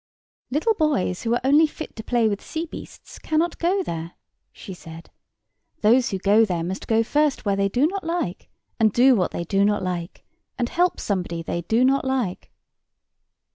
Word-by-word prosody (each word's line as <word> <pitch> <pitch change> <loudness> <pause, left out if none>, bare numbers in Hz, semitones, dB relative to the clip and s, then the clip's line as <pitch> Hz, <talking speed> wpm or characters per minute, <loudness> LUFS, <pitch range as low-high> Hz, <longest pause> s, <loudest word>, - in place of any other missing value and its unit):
"Little 305 - +1
boys 295 - 0
who 235 0 0
are - - -1
only 295 +4 +5
fit 310 +1 -9
to 220 - -7
play 235 -1 +2
with 205 -1 -2
sea 325 +1 -4
beasts 320 - -11
cannot 320 +2 -1
go 375 +3 +1
there," 165 - -5 0.4
she 190 - -10
said. 165 -1 -12 0.7
"Those 235 +4 +4
who 195 - -2
go 205 +4 +4
there 175 -6 -1
must 185 +3 -5
go 225 0 +3
first 290 +2 0
where 200 -1 +2
they 195 0 +1
do 250 +8 +2
not 385 +4 -2
like, 330 - -3 0.3
and 220 -1 +4
do 255 +5 +5
what 185 -5 +1
they 170 - -4
do 195 +3 +1
not 205 -1 +1
like, 175 -2 -5 0.3
and 240 -1 -1
help 355 +1 +1
somebody 175 -4 -2
they 170 +1 -3
do 225 +9 +2
not 270 +1 +2
like." 255 -9 -2
225 Hz, 185 wpm, -23 LUFS, 185-295 Hz, 0.7 s, only